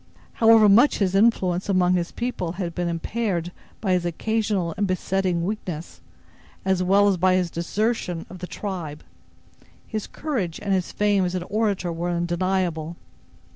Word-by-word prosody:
However 225 -1 +6
much 235 +8 +5
his 190 -3 +1
influence 195 -3 +2
among 180 -2 +3
his 175 -1 -1
people 235 -9 -3
had 175 -2 -4
been 175 0 -2
impaired 175 0 -2 0.3
by 195 -3 0
his 180 -1 +1
occasional 200 0 -1
and 205 0 0
besetting 185 -1 0
weakness, 180 -5 -5 0.6
as 190 -1 +2
well 200 +3 +4
as 195 -2 +2
by 185 +1 +3
his 180 -2 0
desertion 180 0 -2
of 185 - -11
the 180 - -6
tribe, 175 -9 -5 0.8
his 215 -2 -4
courage 230 - -3
and 200 -1 -1
his 185 -2 0
fame 205 -2 +2
as 180 0 -1
an 180 - -2
orator 200 -3 -1
were 170 +2 -3
undeniable. 175 -1 -1
185 Hz, 155 wpm, -24 LUFS, 175-205 Hz, 0.8 s, However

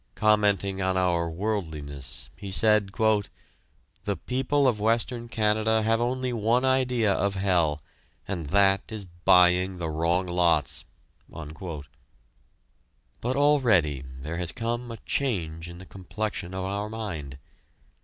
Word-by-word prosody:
Commenting 100 -3 +2
on 95 0 +1
our 85 -2 +1
worldliness, 80 - -4
he 100 -1 -8
said: 105 0 +3 1.2
"The 100 -1 -1
people 135 +2 +1
of 115 -5 +1
Western 115 +2 0
Canada 110 0 +1
have 115 +1 +2
only 125 +1 -1
one 115 +3 +2
idea 125 -5 +2
of 100 +1 0
hell, 85 -7 +1 0.4
and 85 -6 -4
that 95 +4 +3
is 105 -3 -5
buying 90 +1 +3
the 85 -2 -3
wrong 85 +4 +1
lots!" 85 -4 +1 0.4
But 80 -1 -7 1.5
already 115 - +3 0.2
there 80 +3 -4
has 90 -2 -1
come 120 +1 -3
a 115 - -6
change 85 - -2
in 85 - -10
the 95 - -11
complexion 95 0 -5
of 95 0 -3
our 100 +2 -3
mind. 85 -12 -6
95 Hz, 125 wpm, -26 LUFS, 85-110 Hz, 1.5 s, said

